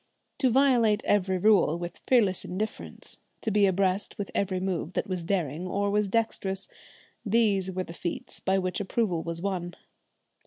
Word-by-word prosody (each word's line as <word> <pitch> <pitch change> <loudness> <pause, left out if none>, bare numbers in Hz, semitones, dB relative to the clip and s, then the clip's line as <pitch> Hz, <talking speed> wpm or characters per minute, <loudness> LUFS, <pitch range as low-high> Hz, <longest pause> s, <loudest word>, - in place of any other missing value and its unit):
To 265 -3 +4
violate 235 -5 +4
every 190 -2 +2
rule 185 -5 +4
with 175 0 -6
fearless 210 -8 +3
indifference, 210 +4 -5 0.2
to 220 - -1
be 205 -1 +4
abreast 190 +1 0
with 205 - -4
every 190 -2 0
move 185 -2 -2
that - - -1
was 185 -3 -3
daring 170 -2 -1
or 200 +2 0
was 210 0 +2
dexterous, 195 -3 -1 0.6
these 205 -4 +2
were 185 0 -2
the 165 - -9
feats 170 0 -5
by 190 0 +1
which 185 +1 -1
approval 200 -4 0
was 170 +1 -5
won. 180 -3 -2
195 Hz, 160 wpm, -28 LUFS, 180-210 Hz, 0.6 s, To